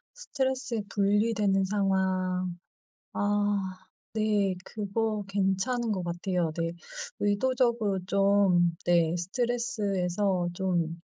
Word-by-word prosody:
스트레스에 265 - -2
분리되는 205 -1 +2
상황. 185 -2 0 0.6
아 205 0 +1 0.6
네 210 -3 +2
그거 215 +1 -2
괜찮은 200 +5 0
것 190 -3 -1
같아요. 175 -1 -1
네. 165 0 0 0.5
의도적으로 225 -1 +1
좀 195 -4 +3
네 170 -2 +3
스트레스에서 195 -3 0
좀 175 -3 -1
200 Hz, 200 characters per minute, -28 LUFS, 185-215 Hz, 0.6 s, 좀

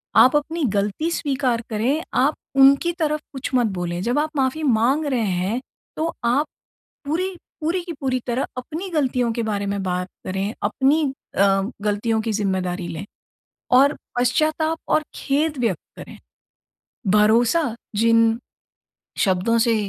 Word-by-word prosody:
आप 260 +3 +7
अपनी 315 +3 0
गलती 205 +11 0
स्वीकार 265 -7 0
करें, 245 +9 0
आप 280 +4 +3 0.2
उनकी 275 +5 +6
तरफ 305 -1 +1
कुछ 265 - -4
मत 245 -2 +3
बोलें। 175 0 -3
जब 245 +6 +1
आप 310 +1 0
माफ़ी 265 +4 0
माँग 265 +4 +2
रहे 260 -5 0
हैं 190 +3 0 0.4
तो 330 +1 -1
आप 260 +6 +3 0.6
पूरी 360 +6 -1 0.3
पूरी 340 +4 0
की 345 -1 -6
पूरी 260 -2 0
तरह 250 +2 0
अपनी 320 +9 -5
गलतियों 255 -7 +1
के 235 0 -2
बारे 205 -2 -2
में 200 0 -2
बात 180 0 -2 0.2
करें, 195 +3 -2
अपनी 270 +9 +2 0.3
अ, 195 0 +4 0.2
गलतियों 210 +2 0
की 225 0 -2
ज़िम्मेदारी 185 -3 -1
लें 165 +2 -6 0.7
और 275 +3 +5 0.2
पश्चाताप 310 +6 +1
और 310 - +3
खेद 295 +2 0
व्यक्त 225 -9 0 0.2
करें। - - -10 0.9
भरोसा 230 +6 +3 0.2
जिन 230 +1 +4 0.8
शब्दों 190 +4 +2
से 230 0 +3
245 Hz, 140 wpm, -22 LUFS, 210-295 Hz, 0.9 s, आप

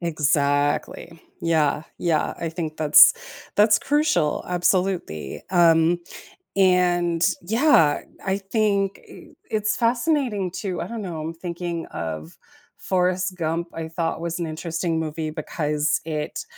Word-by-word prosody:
Exactly, 145 0 0 0.2
yeah, 155 -3 +1 0.2
yeah, 165 -3 0
I 165 - -3
think 160 -2 -5
that's 150 -2 +8 0.4
that's 210 +1 +5
crucial, 290 - +1
absolutely, 180 - -1
um, 170 -1 +4 0.6
and, 175 -3 +3 0.2
yeah, 215 - +3 0.3
I 190 0 0
think 200 -1 0
eh - - -13 0.2
it's 215 -1 0
fascinating, 235 - 0
too 185 0 -4
I - - -4
don't 230 -2 -5
know, 170 -5 -5
I'm 160 +2 -4
thinking 170 -1 -5
of 80 0 -6 0.4
Forrest 185 0 0
Gump, 165 +1 -2
I 165 -1 -5
thought 165 0 -3
was 170 +1 -3
an 170 - -1
interesting 165 +1 -2
movie 155 0 -3
because 150 -1 -1
it 155 - -4
170 Hz, 125 wpm, -23 LUFS, 155-190 Hz, 0.6 s, that's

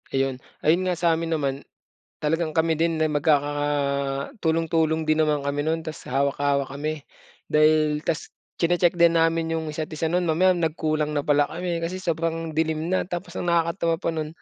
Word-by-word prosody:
Ayun. 135 -1 -1 0.2
Ayun 165 +4 +4
nga, 180 -1 0
sa'min 165 -1 +1
naman, 140 -4 -1 0.6
talagang 160 +1 0
kami 160 0 +3
din 165 +1 0
na 155 - +1
magkakatulong-tulong 145 - 0
din 155 0 +2
naman 150 -2 +1
kami 140 +1 -1
nun 160 +2 -1
ta's 155 - -6
hawak-hawak 140 +1 0
kami. 150 +1 -4 0.4
Dahil 155 0 +3
ta's 160 0 -3 0.2
tsine-check 175 +1 +2
din 170 -1 +5
namin 165 0 +1
'yung 160 -1 -2
isa't 155 +1 -5
isa 160 +1 -1
nun, 180 +2 +1
mamaya 180 +3 +3
nagkulang 155 -2 -1
na 145 - 0
pala 145 0 +3
kami, 170 +1 -3
kasi 185 +3 -4
sobrang 165 -2 -2
dilim 160 0 0
na. 185 +1 +1
Tapos 180 +1 -6
ang - - -3
nakakatawa 170 0 +1
pa - - -2
nun, 155 -2 -3
160 Hz, 165 wpm, -24 LUFS, 150-165 Hz, 0.6 s, din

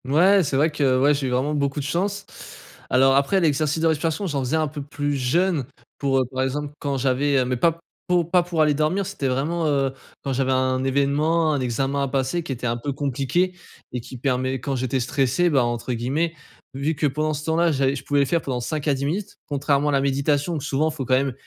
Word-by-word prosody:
Ouais 180 +8 +4
c'est 140 - -2
vrai 155 +3 +3
que, 150 - -6
heu, 130 -1 +3
ouais, 145 +2 +5
j'ai 140 -2 -1
eu - - -1
vraiment 130 +4 0
beaucoup 140 0 -1
de 140 - -4
chance. 200 +6 -1 0.6
Alors, 135 +1 +4
après, 140 +8 +3
l'exercice 155 -2 +1
de 165 - +3
respiration, 160 +4 0
j'en 145 -6 -1
faisais 130 +5 -1
un 155 -1 +1
peu 145 0 -6
plus 145 +1 -3
jeune 150 +3 +1 0.3
pour, 135 -1 +1
heu, - - +3
par 130 0 -2
exemple, 145 +2 -3
quand 140 -1 -2
j'avais, 135 +2 +1
heu, 130 - +2
mais 125 +1 -1
pas 165 +6 +1 0.3
pou 180 -1 +3
pas 180 +2 +3
pour 170 -2 -1
aller 150 -1 +3
dormir 155 +7 0
c'était 140 - -3
vraiment, 155 +6 0
heu, 135 -2 +1 0.3
quand 135 - -2
j'avais 130 0 0
un 130 0 +1
événement, 150 +4 +2
un 145 - 0
examen 135 +3 -1
à 140 - 0
passer 135 +5 -1
qui 160 - -6
était 125 -1 -4
un 115 +1 -1
peu 130 +4 -3
compliqué 140 +6 0 0.4
et 125 - -3
qui 130 - -10
permet, 130 0 -1
quand 135 +2 -3
j'étais 130 +1 -1
stressé, 135 +7 +1
bah, 135 -4 +3
entre 120 +1 -2
guillemets 140 +8 -1 0.4
«Vu 140 +4 -1
que 150 - 0
pendant 155 +2 0
ce 150 +1 -5
temps-là, 165 +1 +2
j'allais 135 -1 +1
je 135 - -7
pouvais 145 -1 +2
le - - +3
faire 165 +4 0
pendant 130 -4 -3
5 155 +4 -3
à 145 - +4
10 135 +1 -3
minutes». 185 +7 -3
Contrairement 145 0 +1
à - - +2
la 140 -1 +2
méditation, 140 +3 +1
où 150 - -3
souvent 150 +2 0
faut 150 -4 -5
quand 130 - 0
même, 135 0 +1
140 Hz, 240 wpm, -23 LUFS, 130-155 Hz, 0.6 s, ouais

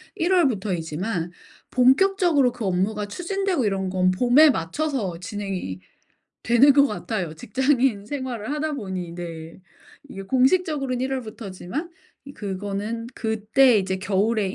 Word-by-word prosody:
1 350 +3 +1
월부터이지만 190 - -1 0.4
본격적으로 285 +1 +4
그 240 -3 -6
업무가 195 +3 0
추진되고 360 - -1
이런 195 -2 -1
건 185 0 +2
봄에 250 +10 +5
맞춰서 210 - -2
진행이 190 - -5 0.6
되는 240 +5 +5
것 280 +1 +5
같아요 185 - -4
직장인 255 - +1
생활을 260 -3 -4
하다 305 +1 -2
보니. 190 -9 -5
네. 165 -2 -8 0.5
이게 195 - -8
공식적으로는 265 - +1
1 260 +1 -1
월부터지만 230 - -6 0.3
이 280 - -10
그거는 205 +2 -4
그때 220 +2 +3
이제 190 -1 -1
겨울의 200 +1 0
220 Hz, 295 characters per minute, -23 LUFS, 190-270 Hz, 0.6 s, 봄에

